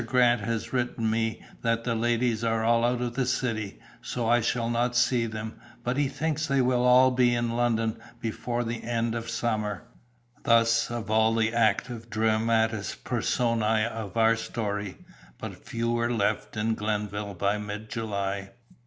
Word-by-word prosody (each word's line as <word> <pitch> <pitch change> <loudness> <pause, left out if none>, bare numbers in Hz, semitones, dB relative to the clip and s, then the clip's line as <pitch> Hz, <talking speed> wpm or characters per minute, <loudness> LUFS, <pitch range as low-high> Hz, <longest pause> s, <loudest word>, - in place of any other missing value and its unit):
Grant 120 -1 +3
has 115 +4 -3
written 120 -2 -1
me 110 0 -1 0.2
that 115 0 0
the 120 - 0
ladies 115 0 +1
are 115 -1 +1
all 115 +1 +3
out 120 0 +1
of 120 -1 -3
the 130 0 0
city, 115 -5 -2 0.2
so 120 -2 -3
I 120 +1 +4
shall 115 +1 0
not 120 +1 0
see 120 -1 +3
them, 110 0 -6 0.2
but 125 +1 -1
he 145 0 +2
thinks 155 +2 -2
they 140 -2 +2
will 125 -1 +2
all 130 +1 +6
be 125 -1 +3
in 120 -1 0
London 115 -2 0 0.2
before 120 +2 -2
the 115 0 -4
end 115 -1 -1
of 115 0 -4
summer." 110 -4 -1 0.6
Thus 115 0 +3
of 115 -2 -4
all 110 +1 +4
the 110 0 +1
active 115 0 0
dramatis 110 -1 +1
personæ 115 -2 +1
of 110 -2 -6
our 115 0 +5
story, 105 -4 -4 0.4
but - - -8
few 115 0 -1
were 120 0 0
left 110 -1 -1
in 110 +1 +1
Glenville 105 -1 -3
by 100 +3 0
mid 105 +1 -6
July. 100 -4 -3
115 Hz, 165 wpm, -27 LUFS, 110-120 Hz, 0.6 s, all